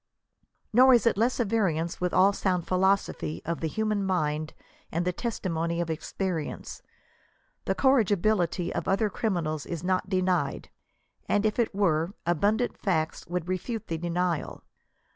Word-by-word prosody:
Nor 255 +2 +7
is 235 - +2
it 230 - +4
less 235 +6 +1
at 240 - +2
variance 175 -7 0
with 180 -1 0
all 195 +2 +5
sound 180 -3 0
philosophy 185 - +1
of 170 0 -2
the 165 - -1
human 215 +3 -1
mind 155 -5 -1 0.4
and 170 +2 -1
the 180 - 0
testimony 170 -7 -2
of 170 -1 -1
experience. 165 0 -4 0.8
The - - 0
corrigibility 205 -8 +2
of - - -3
other 200 +2 +1
criminals 165 -9 -2
is 170 -1 -5
not 185 +1 0
denied, 185 -2 0 0.6
and, 205 +1 +2
if 215 +2 0
it 230 -4 +1
were, 175 -2 +1
abundant 205 +8 +1
facts 160 -6 -1
would 175 0 -3
refute 190 +5 -3
the 165 - -1
denial. 175 -1 -2
185 Hz, 145 wpm, -27 LUFS, 170-210 Hz, 0.8 s, Nor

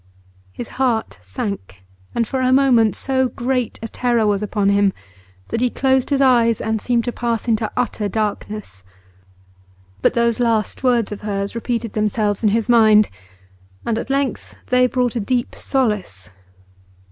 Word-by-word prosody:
His 235 - -7
heart 230 - 0
sank, 95 +1 -6 0.3
and 230 -2 +1
for 265 +2 -2
a 255 0 +2
moment 255 -5 +4
so 260 -1 +1
great 250 -1 -2
a - - -3
terror 235 -1 0
was 205 -1 +1
upon 205 -1 0
him 200 -1 +3 0.6
that 230 - -2
he 250 - +3
closed 265 0 +1
his 280 -2 +1
eyes 235 -4 +4
and 220 -1 -2
seemed 240 -2 +1
to 245 - -2
pass 235 -1 -2
into 220 -2 0
utter 215 -4 -1
darkness. 210 - -4 1.2
But - - +2
those 235 -1 +2
last 225 -4 0
words 240 -5 +2
of 210 - -6
hers 200 -1 -3
repeated 230 -1 -3
themselves 210 -1 0
in 215 - +3
his 225 +1 0
mind, 220 -3 +5 0.8
and 230 -1 0
at - - -6
length 275 -1 -2
they 250 0 +4
brought 250 -1 -1
a - - 0
deep 240 +3 -1
solace. 205 - -2
230 Hz, 160 wpm, -20 LUFS, 210-245 Hz, 1.2 s, mind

